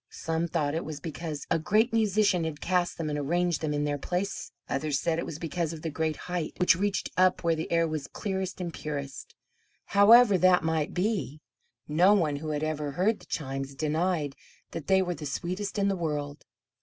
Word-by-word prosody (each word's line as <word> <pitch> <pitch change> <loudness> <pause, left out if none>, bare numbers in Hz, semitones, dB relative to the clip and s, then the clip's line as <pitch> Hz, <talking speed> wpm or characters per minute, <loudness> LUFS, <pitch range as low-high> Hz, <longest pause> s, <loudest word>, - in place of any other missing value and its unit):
Some 165 +1 -2
thought 155 -4 -1
it 165 - -2
was 155 -2 -6
because 155 -1 -5
a 165 - +3
great 215 +9 +2
musician 210 -5 +3
had 160 -2 -4
cast 180 -1 0
them 165 - -3
and 150 -1 -2
arranged 175 +4 0
them 155 -2 -1
in 145 0 0
their 145 -1 -1
place; 180 +6 -3 0.2
others 140 0 -1
said 165 +1 0
it - - -3
was 150 - -5
because 165 0 -2
of 155 - -9
the 165 - -2
great 160 +1 -1
height, 180 -3 -3
which 180 -2 +5
reached 200 +2 -1
up 185 0 +3
where 165 -1 +3
the 160 - -5
air 165 0 +3
was 155 -3 -4
clearest 190 -2 -4
and 175 -2 -4
purest; 140 -3 -6 0.5
however 205 0 +7
that 180 -2 +5
might 160 -2 -1
be 180 - -1 0.5
no 180 +7 +5
one 155 -7 +1
who 155 +2 -5
had 150 0 -2
ever 150 -2 -2
heard 205 +8 +1
the - - -17
chimes 135 -2 -4
denied 155 -1 0 0.4
that 160 -4 -6
they 190 0 +4
were 180 -1 -2
the 150 -3 -6
sweetest 185 +8 -3
in 200 -1 +2
the 195 - +1
world. 150 -4 -3
165 Hz, 205 wpm, -28 LUFS, 150-185 Hz, 0.5 s, however